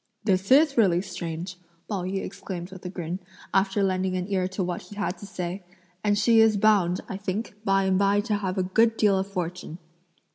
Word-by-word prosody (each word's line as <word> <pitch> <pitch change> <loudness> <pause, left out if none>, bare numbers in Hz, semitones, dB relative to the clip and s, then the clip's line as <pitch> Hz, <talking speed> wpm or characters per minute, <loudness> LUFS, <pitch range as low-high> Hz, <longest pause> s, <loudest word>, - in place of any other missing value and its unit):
"This 190 -2 +1
is 275 -1 +5
really 180 -4 +4
strange!" 175 -1 -5 0.3
Pao 200 -4 -2
yü 195 +1 -2
exclaimed 180 -1 -6
with 190 -1 -11
a 180 - -4
grin, 175 -1 -4 0.3
after 195 +1 +2
lending 185 -1 0
an 180 0 -3
ear 185 -2 +1
to 190 +1 -3
what 175 -1 -3
he 205 - -12
had 205 -2 -2
to 200 - -9
say; 180 0 -5 0.4
"and 205 -1 +2
she 225 +2 +4
is 220 -2 +4
bound, 195 -4 +3
I 190 - -5
think, 200 +3 -4
by 195 -2 +2
and 190 0 +2
by 200 +1 +3
to 210 -1 -1
have 190 -1 -3
a 185 - +2
good 225 +5 +2
deal 200 -3 +3
of 190 - -2
good 200 - -20
fortune!" 180 -2 -4
195 Hz, 215 wpm, -26 LUFS, 185-205 Hz, 0.4 s, is